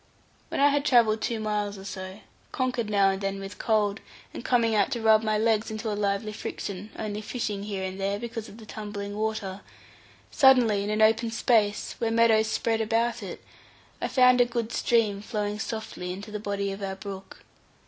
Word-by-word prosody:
When - - -3
I 285 +1 +6
had 285 0 +1
travelled 230 -6 +4
two 230 -2 -1
miles 210 -1 -2
or 190 - -10
so, 190 0 -7 0.3
conquered 250 -4 -1
now 200 -2 +4
and 195 +1 -4
then 195 0 -2
with 195 +1 -8
cold, 210 -2 +1 0.3
and - - -7
coming 235 -3 +2
out 205 -2 +3
to 240 - -2
rub 220 -1 +5
my 215 -1 +1
legs 220 0 +1
into 220 0 -3
a - - -1
lively 205 +1 -1
friction, 200 0 -6
and - - -4
only 210 0 -4
fishing 210 -2 -3
here 200 -2 -4
and 190 +1 -5
there, 200 +1 0
because 225 0 -6
of 210 - -13
the 225 - -12
tumbling 205 -2 -6
water; 210 -3 -3 0.7
suddenly, 245 -7 +5
in 205 - -3
an 215 +1 +2
open 225 +2 +3
space, 220 -2 +1
where 230 - 0
meadows 225 -1 +4
spread 225 0 0
about 230 +2 0
it, - - -8 0.6
I - - 0
found 250 -1 +5
a - - +6
good 235 -2 -3
stream 215 -5 +1
flowing 210 -1 -3
softly 220 -5 -5
into 200 +3 -7
the 210 - -4
body 200 -1 -2
of 195 +1 -7
our 190 -1 -3
brook. 195 -1 -9
215 Hz, 200 wpm, -27 LUFS, 200-225 Hz, 0.7 s, I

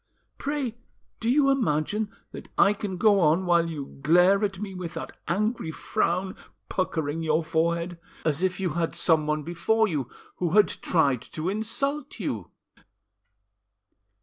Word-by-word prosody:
"Pray, 275 -5 -2 0.4
do 225 - -1
you 275 +1 +4
imagine 210 - 0 0.2
that - - -9
I 200 - +6
can 200 -3 -5
go 205 0 +5
on 170 +2 +3
while 170 -1 +3
you 145 -4 -7
glare 180 +7 +5
at 195 -2 -1
me 195 0 -5
with 180 -2 -6
that - - -5 0.2
angry 215 0 0
frown 180 +3 -1 0.3
puckering 160 -4 -1
your 160 0 +1
forehead, 170 +1 0 0.3
as 155 0 +1
if 185 0 0
you 185 -3 0
had 165 +1 -1
someone 155 -2 +2
before 215 +7 +1
you 145 - -2 0.3
who 175 -2 -1
had 210 0 +6
tried 140 -8 +1
to 160 +3 -2
insult 275 +8 -2
you?" - - -3
180 Hz, 145 wpm, -26 LUFS, 160-210 Hz, 0.4 s, I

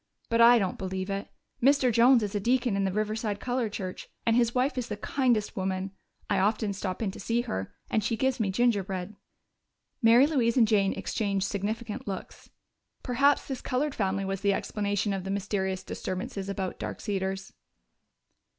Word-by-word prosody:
But 230 -1 +3
I 240 +1 +8
don't 190 -5 -1
believe 190 +1 -3
it. 195 +1 -3 0.3
Mr. 270 -1 +4
Jones 240 +1 +6
is 205 - -3
a 205 - 0
deacon 240 +1 +1
in 195 0 +1
the 190 - 0
Riverside 215 0 -2
Colored 245 -3 -1
Church, 185 -3 -6 0.2
and 230 - +3
his 235 0 +2
wife 255 +3 +1
is 250 -2 -2
the 210 - -4
kindest 235 -3 0
woman. 190 -1 -2 0.4
I - - +1
often 210 +1 +1
stop 190 +1 -3
in 200 - -1
to - - -11
see 230 +4 0
her, 95 - -4 0.2
and 215 - 0
she 225 +2 0
gives 265 0 +1
me 210 -3 +1
gingerbread." 195 -3 0 0.9
Mary 235 +3 +7
Louise 260 -6 +1
and 230 -3 +6
Jane 200 -3 +3
exchanged 200 -3 -1
significant 215 +2 -3
looks. 195 -2 -7 0.5
Perhaps 280 +3 +3
this 265 -2 -4
colored 275 +3 -1
family 195 -3 -1
was 195 0 -3
the 200 -1 +3
explanation 205 0 -1
of 190 -1 -3
the 195 - -5
mysterious 190 -1 -2
disturbances 190 +1 -4
about 195 -2 -3
Dark - - -5
Cedars. 190 -1 -3
210 Hz, 180 wpm, -28 LUFS, 195-235 Hz, 0.9 s, I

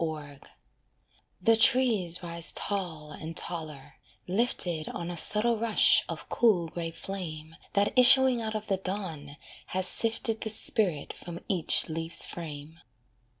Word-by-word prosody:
COROT 150 -3 -8 0.9
The 225 0 +3
trees 220 -8 +1
rise 170 -1 0
tall 170 -7 -3
and 160 +2 -9
taller, 155 -5 -3 0.3
lifted 180 -6 0
On 170 0 -6
a - - -6
subtle 215 +6 +4
rush 225 -1 +4
of - - -7
cool 185 -8 +1
grey 165 0 -6
flame 165 -3 -8 0.2
That 200 0 0
issuing 255 -1 +6
out 220 -1 -5
of 215 0 -5
the 195 -3 -2
dawn 175 -7 -7 0.3
has 185 0 +2
sifted 225 +2 +2
The 220 - 0
spirit 195 -7 +1
from 170 -1 -10
each 180 -5 0
leaf's 165 +1 0
frame. 160 -1 -9
175 Hz, 135 wpm, -27 LUFS, 160-215 Hz, 0.9 s, issuing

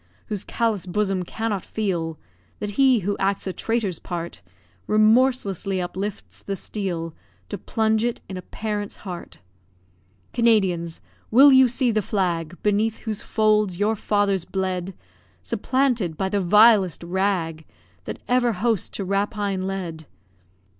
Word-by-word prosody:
Whose 205 -3 -3
callous 220 -6 -1
bosom 195 0 0
cannot 205 +1 -3
feel 170 -7 -2 0.4
That 210 -1 -4
he 255 +1 +4
who 200 +2 -1
acts 195 0 0
a 190 - -3
traitor's 220 -7 -1
part, 170 -1 -6 0.5
Remorselessly 215 -4 +3
uplifts 190 +3 -5
the 200 - -4
steel 175 -5 -4 0.4
To - - -5
plunge 220 -1 +1
it 240 -1 -1
in 190 - -6
a 185 - -5
parent's 210 +2 -4
heart. 180 -3 -8 0.9
Canadians! 190 -8 +2 0.3
will 275 +5 +8
you 260 0 +7
see 245 0 +1
the 215 -1 +1
flag, 175 -4 -1
Beneath 215 +2 +1
whose 215 -2 -2
folds 215 -4 +2
your 215 +2 +2
fathers 200 -3 +1
bled, 185 0 -3 0.5
Supplanted 230 - 0
by 190 - -1
the 200 0 0
vilest 205 -2 +5
rag 175 -3 -1 0.4
That - - -5
ever 245 -1 +2
host 220 0 -1
to 195 - -3
rapine 200 -1 -1
led? 170 -5 -5
200 Hz, 135 wpm, -23 LUFS, 185-220 Hz, 0.9 s, will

